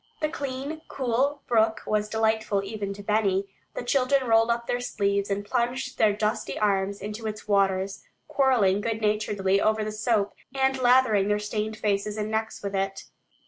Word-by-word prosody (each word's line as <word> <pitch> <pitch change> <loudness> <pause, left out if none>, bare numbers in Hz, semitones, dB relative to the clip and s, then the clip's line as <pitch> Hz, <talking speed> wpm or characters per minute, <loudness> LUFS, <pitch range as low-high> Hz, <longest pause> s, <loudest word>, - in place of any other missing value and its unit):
The 305 - 0
clean 280 +1 -5
cool 265 +3 -1
brook 220 -1 +2
was 210 0 0
delightful 220 -2 +1
even 200 0 -4
to 205 - -10
Benny. 200 -2 +1 0.3
The - - -4
children 265 +1 +2
rolled 225 0 +4
up 235 0 0
their 245 - -1
sleeves 200 -4 -1
and 200 +1 -2
plunged 250 +3 -2
their 215 -1 +5
dusty 210 +1 -2
arms 200 -1 0
into 210 +2 -5
its 215 0 -6
waters, 195 -1 +1 0.3
quarreling 225 -8 +3
good 225 0 -2
naturedly 210 -2 +1
over 215 0 +2
the 215 - -3
soap, 215 -1 0 0.2
and 265 0 +1
lathering 245 -5 +4
their 210 0 +2
stained 210 +1 -3
faces 210 0 -1
and 215 0 -3
necks 220 -1 -2
with 200 0 -3
it. 195 0 -2
215 Hz, 170 wpm, -26 LUFS, 200-240 Hz, 0.3 s, their